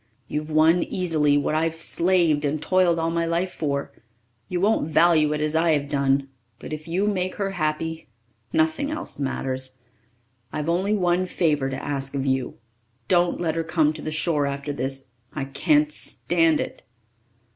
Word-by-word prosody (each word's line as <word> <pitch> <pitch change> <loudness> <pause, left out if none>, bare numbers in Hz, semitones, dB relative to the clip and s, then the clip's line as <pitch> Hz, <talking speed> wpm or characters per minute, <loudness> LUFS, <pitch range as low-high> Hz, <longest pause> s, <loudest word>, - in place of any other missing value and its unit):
You've 150 +1 -4
won 160 +3 +4
easily 155 -6 +1
what 145 +1 0
I've 160 +1 +1
slaved 165 -2 +2
and 150 +1 0
toiled 180 +1 +2
all 165 0 0
my 170 0 0
life 175 +2 -1
for. 140 -3 -2 0.6
You 180 - -1
won't 200 -4 +1
value 160 -1 +4
it 150 0 -1
as 155 +1 0
I'd 160 -2 +3
have 140 0 -9
done 140 -1 +1 0.3
but - - -8
if 155 +1 -7
you 180 +5 0
make 185 -3 -1
her 195 -1 -2
happy, 160 -1 -2 0.4
nothing 160 - +1
else 310 - -4
matters. 130 -1 -3 0.7
I've 150 +1 -3
only 190 +5 +1
one 180 -1 +1
favour 150 -6 +1
to 135 0 -4
ask 140 -1 -3
of 135 0 -1
you. 130 -2 -1 0.5
Don't 175 -1 +3
let 165 -2 0
her 165 0 -1
come 160 -2 +2
to 155 - -8
the - - -4
shore 155 -2 +1
after 140 +1 -4
this. 135 0 -3 0.2
I 140 -3 -3
can't 300 - +2
stand 165 - +1
it." - - -5
160 Hz, 170 wpm, -24 LUFS, 145-175 Hz, 0.7 s, won